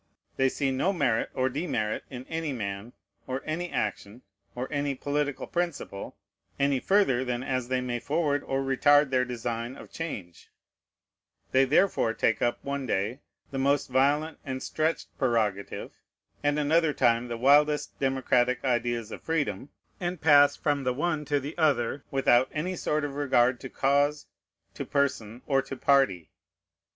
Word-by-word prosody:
They 135 0 +3
see 135 0 -1
no 135 +9 +1
merit 130 - +1
or 130 - +1
demerit 130 -6 -2
in 130 -1 -8
any 160 -1 -3
man, 100 0 -5 0.3
or 130 +1 -3
any 175 +3 -3
action, 105 +2 -3 0.3
or 125 +1 -3
any 145 -1 -1
political 145 +1 -2
principle, 170 - -4 0.4
any 140 -1 +2
further 190 -8 +2
than 125 -1 -2
as 130 -2 -2
they 130 0 0
may 120 -1 -2
forward 145 +1 0
or 135 0 -1
retard 145 +1 +4
their 130 -1 +2
design 120 0 -4
of - - -12
change; 100 - -7 1.0
they 135 +1 +5
therefore 135 - +2
take 115 - +1
up, 120 - +1
one 140 -1 -3
day, 110 +6 -1 0.3
the 135 - -3
most 140 +1 +1
violent 145 +5 +2
and 130 -2 -5
stretched 160 +1 -2
prerogative, 110 -6 -1 0.5
and 145 0 +1
another 155 +1 +2
time 120 -2 +2
the 120 -1 -4
wildest 145 +4 +3
democratic 130 -2 +1
ideas 120 -2 0
of - - -7
freedom, 150 -3 -2 0.3
and 175 -1 -3
pass 145 -2 +6
from 145 -2 -1
the 125 -1 0
one 155 +1 -1
to 145 0 +1
the 140 +3 -7
other 140 -3 +1
without 130 -2 +3
any 175 +5 -2
sort 150 -3 -1
of 145 - -5
regard 130 -3 +2
to 130 - -8
cause, 145 +3 +1 0.5
to - - -5
person, 130 -5 -1
or 135 -2 +2
to 135 0 -8
party. 125 - +2
135 Hz, 155 wpm, -27 LUFS, 120-145 Hz, 1.0 s, pass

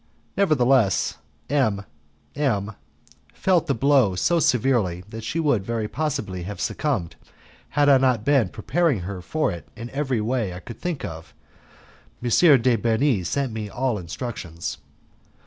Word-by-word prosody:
Nevertheless, 130 - +2 0.3
M 110 -8 +1 0.5
M 110 -8 0 0.6
felt 180 -3 +2
the 140 - +1
blow 130 -6 +3
so 170 - +2
severely 120 - +1
that 115 -1 -7
she 160 +9 -2
would 140 -11 +2
very 115 0 -2
possibly 135 - -3
have 100 +4 -6
succumbed, 125 - -2 0.5
had 145 0 +2
I 140 -2 +7
not 125 -4 +2
been 135 -9 +3
preparing 160 - 0
her 90 +1 -5
for 155 - -1
it 85 -2 -8
in 115 +2 -8
every 135 -4 -1
way 110 -4 -1
I - - -7
could 115 +4 -11
think 175 -5 -3
of. 80 0 -9 0.8
M. 120 - -2 0.3
de 125 -1 +4
Bernis 115 - +1
sent 135 -5 -1
me 110 -2 -4
all 120 0 -1
instructions. 85 -2 -6
120 Hz, 145 wpm, -24 LUFS, 100-140 Hz, 0.8 s, I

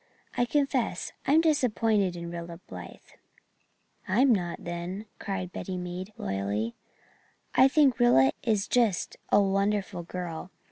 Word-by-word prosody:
I 245 - +2
confess 275 -2 0 0.2
I'm 305 +4 +5
disappointed 225 - +2
in 170 0 -6
Rilla 170 0 -7
Blythe." 90 -2 -10 1.0
"I 205 +7 +3
am 265 -2 +6
not, 175 -4 -2
then," 175 +4 -5
cried 185 -2 -4
Betty 185 0 -5
Meade, 180 +2 -5
loyally, 100 +4 -2 0.8
"I 260 - +7
think 275 -2 +3
Rilla 135 - +5
is 215 -4 +1
just 230 -7 +1
a - - +6
wonderful 195 -1 0
girl. 175 0 -6
190 Hz, 130 wpm, -28 LUFS, 170-240 Hz, 1.0 s, I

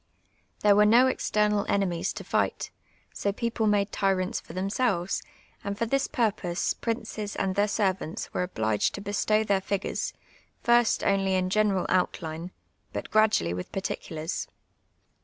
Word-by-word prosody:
TluTc 205 -1 +6
were 210 - +6
no 235 +4 +6
external 210 -5 +1
enemies 180 -4 0
to - - -7
ti^:ht; - - -1 0.4
so 200 - -1
j)eoplc 225 +1 0
made 205 -1 +2
tyrants 190 -2 0
for 165 - -12
tlienisclves, 195 -1 0 0.4
and 200 0 -3
Ibr 230 0 -2
tins 275 0 +2
])urj)ose 200 -6 0
j)rinces 225 -3 -3
and 190 -1 0
tlieir 205 +1 +2
servants 190 -5 -1
were - - 0
obliged 110 - 0
t(j 200 - -7
bestow 215 +1 +1
their 200 -2 +2
h;^Mires, 195 0 -2 0.5
first 240 -1 +4
only 195 -1 +2
iu 185 - +2
general 200 -2 +2
outline, 170 -2 -1 0.4
but - - -5
i^radually 215 - +3
with 90 - -6
p;irtieulars. 165 -4 -4
200 Hz, 140 wpm, -27 LUFS, 185-215 Hz, 0.5 s, TluTc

